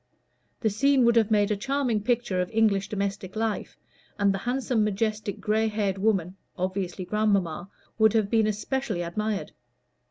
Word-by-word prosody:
The 220 - +1
scene 265 +4 +3
would 235 0 +4
have 225 -2 +4
made 210 -1 +3
a - - +2
charming 250 0 0
picture 230 -5 0
of 180 - -3
English 210 -3 +2
domestic 195 -2 -3
life, 220 -1 -2 0.4
and 200 -1 +3
the 195 - -3
handsome, 245 -1 0
majestic, 210 0 -1
gray 220 +1 +1
haired 205 -3 -1
woman 195 -3 0 0.2
(obviously 185 0 -3
grandmamma) 195 -3 0 0.3
would 220 -1 +5
have 220 -3 +2
been 220 -2 +3
especially 215 -2 -2
admired. 210 +4 -3
210 Hz, 155 wpm, -26 LUFS, 195-225 Hz, 0.4 s, would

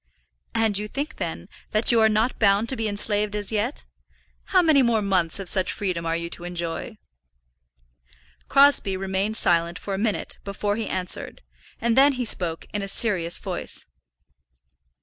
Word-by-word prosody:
"And 220 -3 +2
you 210 - -4
think, 285 +7 -5
then, - - -5 0.3
that 215 +3 +4
you 235 - +4
are 220 - +5
not 220 +4 0
bound 205 +1 +3
to 265 - 0
be 225 -2 -2
enslaved 205 0 +1
as 205 0 -2
yet? 220 +6 -1 0.6
How 370 -2 +3
many 310 -4 +5
more 235 -4 +2
months 185 -5 +1
of 195 - -6
such 185 0 +1
freedom 180 -4 -3
are 165 - 0
you 170 0 -3
to 175 - -6
enjoy?" 175 +4 -5 1.5
Crosbie 275 -9 +4
remained 195 +3 -1
silent 170 0 +2
for 200 - -5
a 190 - -2
minute 215 -1 -1
before 205 +1 -2
he 220 -1 -3
answered, 180 - -4 0.4
and 230 0 +1
then 275 +2 +6
he 250 -1 -3
spoke 170 -6 0
in 205 - -2
a 195 - -4
serious 190 -5 0
voice. - - -4
205 Hz, 170 wpm, -24 LUFS, 185-225 Hz, 1.5 s, then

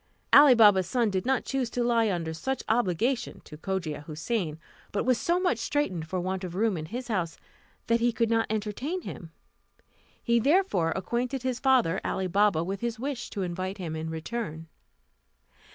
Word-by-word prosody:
Ali 285 -3 +9
Baba's 205 -5 +6
son 235 0 +1
did 190 +4 -2
not 265 -2 +1
choose 265 -3 -1
to 245 +1 -1
lie 230 -2 +2
under 165 -3 -2
such 265 +12 -3
obligation 235 +3 0
to 150 - -12
Cogia 165 -3 -4
Houssain; 160 0 -2 0.3
but 205 - -1
was 255 -2 +2
so 345 +1 +1
much 360 -11 +1
straitened 190 - -1
for 185 +3 -2
want 185 +1 -3
of 180 -1 -5
room 215 0 +1
in 155 -2 -5
his 245 +6 -5
house, 185 -8 -2 0.5
that 230 0 +2
he 240 +1 +2
could 230 0 0
not 225 0 +2
entertain 220 - -3
him. 165 - -8 0.9
He 235 -1 +3
therefore 280 - +2
acquainted 240 +6 -2
his 255 -1 -1
father, 250 -10 +3
Ali 190 - -1
Baba, 195 -2 +2
with 195 +3 -4
his 235 0 -2
wish 260 0 -4
to 200 - -3
invite 185 +2 -4
him 170 -4 -5
in 160 0 -4
return. 160 -1 -5
215 Hz, 180 wpm, -28 LUFS, 180-245 Hz, 0.9 s, Ali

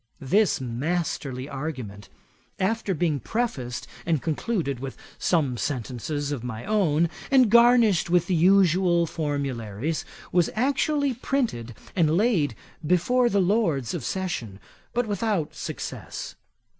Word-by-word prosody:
This 195 +10 +2
masterly 135 0 -2
argument, 130 -9 -6 0.5
after 195 0 0
being 160 -3 0
prefaced 130 - -3 0.2
and 165 -3 +1
concluded 160 - -2
with 135 0 -6 0.2
some 145 -8 +1
sentences 140 +4 -3
of 135 -5 -3
my 115 -2 -5
own, 170 -6 +2 0.2
and 255 -6 +5
garnished 235 -7 +5
with 175 -1 +3
the 185 - -1
usual 180 -1 +4
formularies, 140 -4 -3 0.3
was 175 -2 +3
actually 280 +3 +1
printed 225 - -2 0.2
and 160 -2 +3
laid 180 - +2 0.3
before 180 +10 +3
the 200 -2 +2
Lords 175 - +1
of 170 -7 -4
Session, 125 - -3 0.3
but 245 +1 0
without 205 -5 -1
success. - - -6
170 Hz, 120 wpm, -25 LUFS, 135-205 Hz, 0.5 s, and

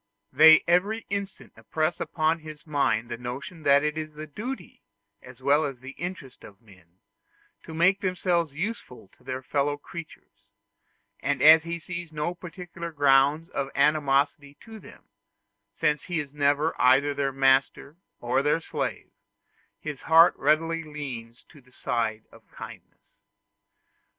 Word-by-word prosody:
They 160 +3 +8
every 200 +6 +1
instant 200 0 -5
impress 155 +1 -2
upon 160 +1 0
his 155 -1 -11
mind 140 -8 0
the 120 -1 -5
notion 130 +7 -7
that 140 -1 +4
it 150 +1 -1
is 155 -1 -7
the 155 +1 -7
duty, 245 - -7 0.4
as 125 0 -15
well 145 +3 +3
as 135 -4 -4
the 135 +2 -9
interest 170 -6 -8
of 100 -1 -14
men, 95 -5 -22 0.6
to 160 - -11
make 180 +4 +3
themselves 180 -4 0
useful 155 - -6
to 125 - -27
their 130 0 -5
fellow 145 +2 -1
creatures; 165 +2 -12 0.7
and 140 -1 -1
as 160 +1 +9
he 170 0 -3
sees 170 0 -7
no 155 +3 -3
particular 175 -1 -8
ground 145 +3 +3
of 135 -1 -3
animosity 145 0 +1
to 225 -1 -11
them, - - -15 0.7
since 150 +8 0
he 175 -2 -3
is 145 -2 -6
never 145 +2 +1
either 135 +3 +4
their 140 -1 -1
master 135 +2 +1 0.2
or 120 +2 0
their 150 +3 +1
slave, - - -5 0.7
his 150 -4 -7
heart 165 +1 +6
readily 165 +3 +1
leans 135 -7 -8
to 145 - -17
the 125 0 -25
side 110 -3 -2
of - - -19
kindness. - - -13
150 Hz, 145 wpm, -26 LUFS, 135-165 Hz, 0.7 s, as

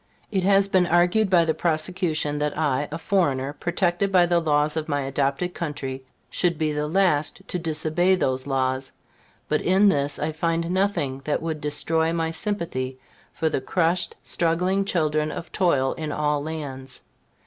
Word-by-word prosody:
It 195 -3 +1
has 195 +1 +4
been 185 -2 +3
argued 175 +5 +3
by 175 -3 +4
the 160 - +1
prosecution 160 -2 0
that 150 0 -1
I, 145 -2 0
a 160 - -3
foreigner, 145 -7 0
protected 175 +3 0
by 180 -2 +5
the 175 0 +2
laws 150 -1 +1
of 160 -1 -3
my 145 -1 0
adopted 140 +6 -1
country, 135 -5 -5 0.2
should 175 -3 0
be 155 -1 0
the 150 0 -2
last 175 0 +1
to 180 - -2
disobey 165 +3 +1
those 130 -6 -1
laws; 130 -1 -1 0.5
but 150 - +1
in 195 +3 +4
this 145 -4 0
I 155 +2 -2
find 165 +2 -1
nothing 180 -9 0
that 150 - 0
should 160 -2 -3
destroy 160 +2 0
my 165 -1 -1
sympathy 165 -9 -2 0.3
for 160 - -1
the 155 - -1
crushed, 170 +5 0
struggling 180 +4 +1
children 155 -4 0
of 170 - -7
toil 140 -8 +2
in 155 -1 -5
all 150 -1 0
lands. 140 -4 -6
160 Hz, 165 wpm, -24 LUFS, 145-175 Hz, 0.5 s, by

